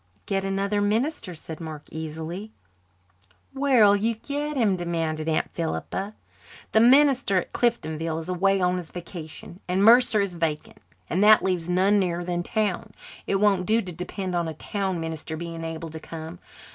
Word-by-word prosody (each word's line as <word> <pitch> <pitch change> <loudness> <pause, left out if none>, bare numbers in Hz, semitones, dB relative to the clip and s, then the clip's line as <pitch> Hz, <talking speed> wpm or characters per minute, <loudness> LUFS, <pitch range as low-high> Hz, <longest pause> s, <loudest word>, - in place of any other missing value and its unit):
"Get 195 -1 -1
another 195 +1 0
minister," 220 - -1
said 160 +1 -9
Mark 155 -2 -7
easily. 160 +6 -6 1.0
"Where'll 255 -7 +5
you 225 +3 0
get 290 +5 -4
him?" 215 -6 +3
demanded 165 -3 -2
Aunt 155 - 0
Philippa. 190 +5 -3 0.6
"The 220 - +4
minister 260 -3 +5
at 180 - -2
Cliftonville 165 -9 -1
is 165 - -8
away 195 +2 +2
on 180 0 +2
his 175 -3 -6
vacation, 170 0 -9
and 185 +2 +1
Mercer 235 -1 +6
is 200 -2 0
vacant, 165 -3 -3 0.3
and 190 +4 +1
that 215 0 +7
leaves 180 -2 -1
none 190 +3 +3
nearer 175 -2 -1
than 175 0 -2
town. 205 0 -2 0.3
It - - +1
won't 195 -2 +2
do 220 +2 +3
to 185 -5 -4
depend 180 +2 -5
on 170 -1 0
a 160 - -5
town 190 +2 -3
minister 160 -1 -5
being 165 0 -6
able 165 0 -5
to 160 - -7
come. 160 +2 -8
180 Hz, 165 wpm, -25 LUFS, 165-210 Hz, 1.0 s, that